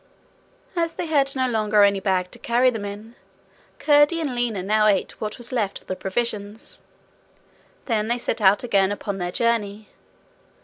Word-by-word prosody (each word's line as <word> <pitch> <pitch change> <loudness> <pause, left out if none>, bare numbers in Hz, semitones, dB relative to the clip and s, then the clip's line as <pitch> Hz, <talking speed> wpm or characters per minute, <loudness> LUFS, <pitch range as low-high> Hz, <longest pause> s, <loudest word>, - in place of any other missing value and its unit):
As 335 -1 0
they - - -3
had 280 -4 +1
no 260 -1 +1
longer 215 -3 +3
any 200 -1 +3
bag 185 -2 -1
to - - -12
carry 250 0 +2
them 220 -4 -5
in, 210 +3 -8 0.6
Curdie 295 +2 +4
and 295 -6 -2
Lina 235 -6 -1
now 215 +2 +3
ate 200 -3 0
what 215 -1 -4
was 240 -1 -5
left 215 -6 -1
of - - -26
the 185 - -4
provisions. 210 +1 -4 1.0
Then 220 -3 0
they 240 +1 0
set 240 - -3
out 200 +2 +4
again 200 -5 +2
upon 200 -1 -4
their 175 0 -3
journey. 215 -1 -1
215 Hz, 170 wpm, -23 LUFS, 200-245 Hz, 1.0 s, Curdie